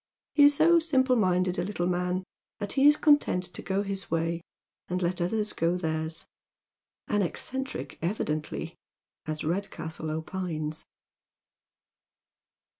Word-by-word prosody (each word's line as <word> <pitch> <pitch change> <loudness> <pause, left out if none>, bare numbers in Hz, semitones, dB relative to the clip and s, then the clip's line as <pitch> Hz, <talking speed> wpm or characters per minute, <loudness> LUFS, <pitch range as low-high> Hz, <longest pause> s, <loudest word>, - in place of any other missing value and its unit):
He 290 - +7
is 290 0 +6
so 335 +3 +6
simple 265 -6 +2
minded 185 -4 +2
a - - +1
little 180 -2 -2
man 180 +1 0 0.3
that 205 - -4
he 275 +1 +5
is 295 0 +7
content 290 -11 +4
to - - -5
go 195 +1 -1
his 195 -1 -4
way 165 +1 0 0.5
and 180 +1 -1
let 180 0 -1
other 210 +5 +1
people 210 - -4
go 180 - +1
theirs. 160 -1 -3 0.8
Au 205 -1 +2
eccentric, 265 - -3
evidently, 155 -4 -2 0.5
as 155 0 -3
Redcastle 160 -2 -3
opines. 160 -1 -4
180 Hz, 130 wpm, -28 LUFS, 165-215 Hz, 0.8 s, He